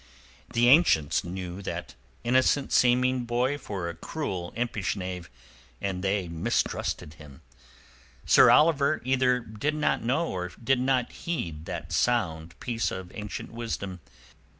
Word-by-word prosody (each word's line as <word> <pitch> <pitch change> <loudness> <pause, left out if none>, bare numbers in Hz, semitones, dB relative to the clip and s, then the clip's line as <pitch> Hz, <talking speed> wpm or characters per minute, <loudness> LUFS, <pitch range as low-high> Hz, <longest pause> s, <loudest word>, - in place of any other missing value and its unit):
The 120 +1 +3
ancients 120 - +5
knew 90 +1 -6
that - - -5 0.3
innocent 130 +3 +2
seeming 125 0 +3
boy 125 +4 0
for 95 -9 -4
a 85 - -4
cruel, 90 - -4
impish 115 -5 -1
knave, 90 -2 -5 0.5
and 95 -2 -3
they 95 -1 0
mistrusted 80 -2 -2
him. 70 -3 -14 0.8
Sir - - +7
Oliver 150 -1 +4
either 130 -1 +3
did 115 +7 -3
not 155 - +1
know 140 +9 0
or 90 -1 -3
did 135 +2 +3
not 130 -1 +1
heed 85 - -4
that - - -6
sound 85 -9 0
piece 115 -6 -1
of 95 -1 -7
ancient 105 -1 -6
wisdom. 110 -5 -5
110 Hz, 130 wpm, -27 LUFS, 90-130 Hz, 0.8 s, Sir